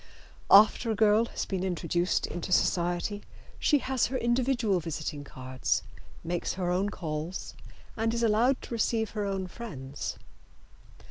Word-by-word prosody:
After 215 +3 +7
a 220 - +1
girl 215 +1 +4
has - - -4
been 190 -2 -2
introduced 180 -1 0
into 175 +1 -5
society 175 +3 +1 0.4
she 295 - +4
has 265 -2 0
her 260 - -2
individual 240 -5 +1
visiting 155 -2 -4
cards, 130 -2 -2 0.4
makes 175 +1 -2
her 180 -1 -1
own 190 +3 +1
calls 160 -1 -5 0.4
and 225 0 0
is 235 0 -1
allowed 230 +4 +3
to - - -7
receive 225 -1 0
her 210 -2 -2
own 195 -1 -2
friends. 165 - -6
200 Hz, 140 wpm, -29 LUFS, 175-230 Hz, 0.4 s, After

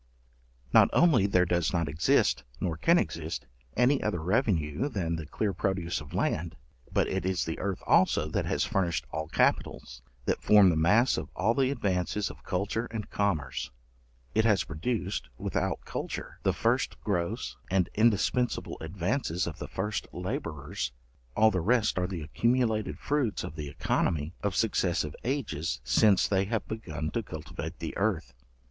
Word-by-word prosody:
Not - - +7
only 145 - +5
there 90 -2 +3
does 85 -2 +1
not 85 -3 +1
exist, 75 +5 +2 0.2
nor 85 -3 -1
can 170 - +4
exist, 80 - -2 0.3
any 130 +3 +4
other 105 -5 -1
revenue 90 - +1
than 85 - -1
the 80 -2 -6
clear 100 +5 -1
produce 90 -2 -1
of 75 - -9
land, 85 +1 -1 0.4
but - - +2
it - - -2
is 95 -1 0
the 80 - -4
earth 95 -1 -3
also - - +4
that - - -1
has - - +1
furnished 85 -6 0
all 80 0 -3
capitals, - - 0 0.2
that - - 0
form 105 -3 +6
the - - 0
mass 105 +11 +4
of - - -4
all 110 +5 +2
the 130 0 +2
advances 100 -5 -1
of - - -16
culture 105 +5 -1
and 110 -2 -6
commerce. 80 -14 -1 0.6
It 110 - +3
has 105 -5 +3
produced, 95 +5 -3
without - - -2
culture, - - -5
the - - +2
first 120 +3 0
gross 85 -5 -2
and 95 -1 +2
indispensible 115 +3 +1
advances 90 - -1
of 85 - -6
the - - -5
first 105 +1 -3
labourers; 90 - -4 0.5
all 110 0 +6
the 90 -3 0
rest 110 0 +2
are 90 - 0
the 90 -3 -5
accumulated 115 - +1
fruits 140 -7 -1
of 75 - -6
the 75 -3 -5
œconomy 75 +2 0
of 100 -3 -1
successive 90 -8 +1
ages, 120 - -2
since 95 - +4
they 95 -1 +2
have 110 +1 -2
begun 80 -9 -4
to 115 - -1
cultivate 80 -7 -7
the - - -5
earth. - - 0
95 Hz, 160 wpm, -29 LUFS, 80-110 Hz, 0.6 s, Not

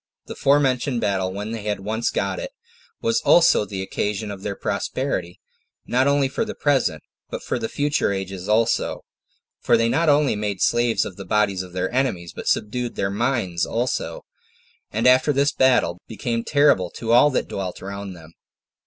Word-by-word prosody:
The - - -8
forementioned 135 -3 +2
battle, 95 -4 0
when 105 +3 -5
they 115 -1 -4
had 105 -1 -3
once 110 +4 -1
got - - -2
it, - - -6 0.5
was 230 0 +1
also 165 -10 +5
the 95 -2 -5
occasion 105 +2 -3
of 100 -1 -8
their 100 0 -4
prosperity, 95 -11 -3 0.5
not 130 +2 +2
only 140 -1 +3
for 130 - -2
the 220 -1 -6
present, 145 -2 +1 0.3
but - - -6
for - - -2
the 110 - -3
future 145 -6 0
ages 95 0 -5
also; 115 +2 +1 0.5
for 120 - +3
they 115 0 +2
not 160 +6 +2
only 145 -4 +3
made 105 -2 -3
slaves 120 -2 +2
of 95 - -8
the 100 - -7
bodies 100 -1 +1
of 90 -1 -10
their 95 +4 -2
enemies, 110 -10 -1
but - - -7
subdued 120 +3 -1
their 95 - -1
minds 105 -6 -1
also, 125 - -2 0.6
and - - -2
after 130 +4 +5
this 140 +1 +2
battle, 125 -9 +2
became 115 +1 -3
terrible 140 - +3
to 115 +4 -4
all 120 +5 +6
that 130 - -1
dwelt 95 -2 -5
round 100 +1 -6
about 85 - -12
them. 80 +1 -16
115 Hz, 180 wpm, -22 LUFS, 95-130 Hz, 0.6 s, all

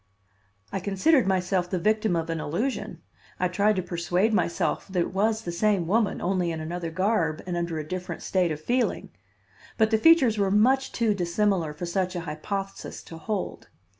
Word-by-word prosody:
I 195 - -2
considered 200 - +2
myself 185 -1 +1
the 185 - -1
victim 215 +1 +1
of 165 0 -1
an 165 - -2
illusion; 200 - -3 0.4
I 180 - +2
tried 205 +4 +2
to 185 - -1
persuade 180 +4 0
myself 170 - 0
that 190 -2 -2
it 170 - -2
was 220 +3 +1
the 175 - -4
same 195 0 +1
woman, 210 +4 +1
only 180 -1 0
in 160 - -4
another 170 +2 -4
garb 175 -3 0
and 180 -1 -3
under 170 -1 -2
a 155 -1 -5
different 180 -1 -5
state 180 -3 +1
of 150 - -3
feeling; 245 +9 -1 0.7
but 220 0 +3
the 220 - +3
features 265 -8 +5
were 200 -1 +2
much 255 +7 +3
too 230 -3 +1
dissimilar 180 -2 0
for 150 +4 -6
such 185 +1 -1
an 175 - -3
hypothesis 195 +5 -5
to 165 - -10
hold. 210 +1 -4
185 Hz, 185 wpm, -26 LUFS, 170-215 Hz, 0.7 s, features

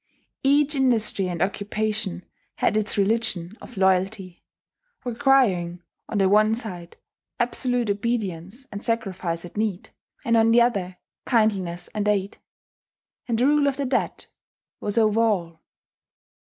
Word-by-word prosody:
Each 285 +2 +3
industry 230 -8 +2
and 175 0 -1
occupation 205 -1 -2 0.3
had - - +1
its 215 -1 0
religion 200 -3 0
of 245 - -12
loyalty, 190 0 0 0.6
requiring, 225 -10 +2 0.3
on 215 - -2
the 195 -1 +4
one 215 +2 +4
side, 180 -7 -7 0.4
absolute 245 0 0
obedience 205 0 -3
and 205 +1 -7
sacrifice 190 -7 -2
at 175 - -12
need; 210 -3 -2 0.3
and 230 - +3
on 225 0 +4
the 230 +1 +6
other, 195 -7 +1 0.3
kindliness 195 -7 +1
and 210 -1 -3
aid. 200 -1 0 0.9
And 230 -2 0
the 245 - +2
rule 290 0 +3
of 275 -1 0
the 280 - -1
dead 255 0 -1 0.5
was 205 +2 -3
over 220 0 +3
all. 175 -8 0
210 Hz, 130 wpm, -24 LUFS, 190-235 Hz, 0.9 s, the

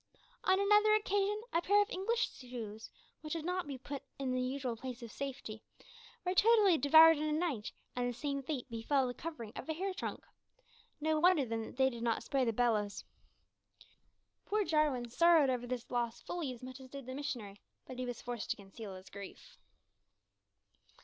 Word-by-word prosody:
On 375 +1 +4
another 420 +1 +5
occasion, 410 0 +1
a 335 - +3
pair 405 +4 +4
of 410 +3 +2
English 460 +5 0
shoes, 225 -4 -8 0.3
which 305 -1 -4
had 325 -2 -3
not 360 -2 -1
been 275 -2 -5
put 275 +2 -6 0.2
in 270 -2 -2
the 255 0 0
usual 255 -1 -2
place 250 +1 -7
of 230 - -8
safety, 255 -5 -6 0.6
were 360 - +1
totally 415 -2 +6
devoured 320 +2 +8
in - - -1
a - - 0
night, 300 -9 -1 0.2
and 245 0 0
the 245 - -6
same 280 0 -2
fate 270 -2 -4
befell 260 +3 +1
the 245 - -3
covering 245 -8 -7
of - - -7
a - - +1
hair 380 +3 -2
trunk. - - -5 0.7
No 310 0 +1
wonder, 345 -4 +5
then, 230 -1 -2
that - - -12
they 265 0 +4
did 235 -1 -7
not 230 -1 0
spare 265 +1 +1
the 230 - +2
bellows! 215 -3 0 1.4
Poor 425 +1 +1
Jarwin 305 -7 +2
sorrowed 320 +2 +5
over 245 -1 -2
this 250 -1 -4
loss 240 -2 -1
fully 335 -7 -3
as 250 0 -10
much 255 +1 -8
as 260 -1 -12
did 275 -1 -8
the 255 - -6
missionary, 240 -8 -5 0.2
but 255 -1 -8
he 255 - -1
was 245 -2 -5
forced 240 -3 -4
to - - 0
conceal 200 0 -9
his 185 +1 -12
grief. 200 -1 -10
265 Hz, 190 wpm, -34 LUFS, 240-330 Hz, 1.4 s, devoured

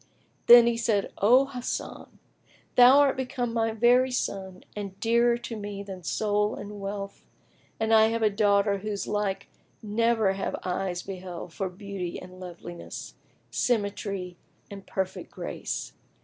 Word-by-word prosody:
Then 235 0 +9
said 215 -4 +2
he, - - -8
"O 250 +7 +6
Hasan, 255 -3 -6 0.6
thou 250 +2 +8
art 280 -2 +3
become 250 -2 -3
my 225 -1 +1
very 240 +3 +4
son 190 -6 -3
and 200 -2 -6
dearer 235 +2 +3
to 235 -1 -7
me 205 -1 -6
than 190 -2 -8
soul 210 +3 0
and 205 0 -8
wealth, 200 0 -6 0.6
and 220 0 +1
I 220 0 +7
have 225 0 -1
a 215 - +4
daughter 200 -1 +2
whose 205 0 -3
like 205 -2 -2 0.4
never 220 -1 +2
have 195 - -3
eyes 180 -1 -2
beheld 180 -3 -7
for 190 +1 -3
beauty 190 -2 -6
and 185 0 -12
loveliness, 175 -1 -8 0.4
symmetry 200 -5 -1 0.3
and 195 -1 -10
perfect 190 -1 -3
grace. - - -5
205 Hz, 140 wpm, -27 LUFS, 195-230 Hz, 0.6 s, Then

